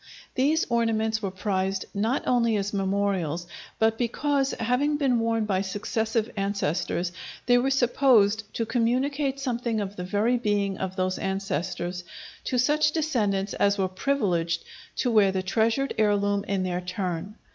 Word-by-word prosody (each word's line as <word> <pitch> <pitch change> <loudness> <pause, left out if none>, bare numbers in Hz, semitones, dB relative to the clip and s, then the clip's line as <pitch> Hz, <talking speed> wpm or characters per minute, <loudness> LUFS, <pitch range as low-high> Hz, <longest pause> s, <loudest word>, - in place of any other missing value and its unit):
These 295 +5 +2
ornaments 220 -2 +1
were 200 - -1
prized 190 0 -1
not 220 +6 0
only 235 -3 +2
as 205 0 -2
memorials, 190 -4 0 0.3
but 225 0 +2
because, 270 +3 +1
having 250 +6 +1
been 265 -5 +2
worn 225 -1 +1
by 190 -3 0
successive 220 +3 -1
ancestors, 185 -3 -1 0.3
they 245 0 +5
were 265 +2 +1
supposed 240 -5 +3
to 230 - 0
communicate 265 +4 0
something 240 -4 -1
of 205 0 -4
the 180 - -4
very 210 +7 +1
being 205 -4 0
of 190 0 -3
those 185 -1 -1
ancestors 185 -2 -3 0.4
to 255 - 0
such 300 +4 +3
descendants 210 -11 0
as 200 0 +2
were 190 -1 +1
privileged 185 -6 0 0.3
to 245 - 0
wear 205 -3 +5
the 190 -1 -2
treasured 225 +7 +1
heirloom 205 -1 +2
in 195 -2 0
their 180 -1 -2
turn. 185 +1 -4
210 Hz, 145 wpm, -26 LUFS, 190-245 Hz, 0.4 s, they